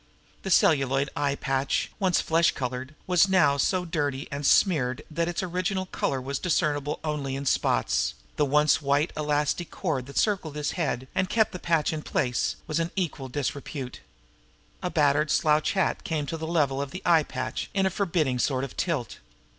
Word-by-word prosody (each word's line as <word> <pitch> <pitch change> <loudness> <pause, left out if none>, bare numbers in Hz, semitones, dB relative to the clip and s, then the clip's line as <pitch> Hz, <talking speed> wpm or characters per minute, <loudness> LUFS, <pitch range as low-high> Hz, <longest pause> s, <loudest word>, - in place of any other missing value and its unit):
The 190 - -5
celluloid 135 -5 +3
eye 145 -1 0
patch, 135 0 -1
once 185 -3 +2
flesh 165 +1 +3
colored, 130 +2 -4
was 180 +1 +4
now 160 -7 +4
so 180 +5 +1
dirty 145 -5 -2
and 140 +1 -4
smeared 130 -10 +3
that 165 +2 0
its 175 +2 -2
original 185 +1 -1
color 135 -6 -2
was 135 +1 -3
discernible 150 -4 0
only 145 -4 -2
in 140 +1 -4
spots, - - +1 0.2
and - - -32
the 150 - +3
once 150 +2 +3
white 140 +3 +1
elastic 150 +2 0
cord 145 -9 -3
that 140 - -8
circled 185 -8 0
his 150 -1 -1
head 135 -7 -2
and 190 -1 0
kept 220 -1 +2
the 180 - -6
patch 165 -3 +1
in 155 - -3
place 135 -8 -1
was 155 -1 -1
in 165 0 0
equal 155 -8 -3
disrepute. 140 -1 -4 0.8
A 180 - -1
battered 150 -2 +2
slouch 150 +2 +2
hat 190 -3 0
came 155 -3 -2
to 165 - -4
the 160 0 -5
level 145 -5 +1
of 140 - -4
the 185 - -8
eye 170 -2 +5
patch 130 -3 -4
in 195 -1 +2
a 190 - +1
forbidding 160 -9 0
sort 130 +1 0
of 140 - -6
tilt. 150 -10 -2
150 Hz, 185 wpm, -26 LUFS, 140-170 Hz, 0.8 s, eye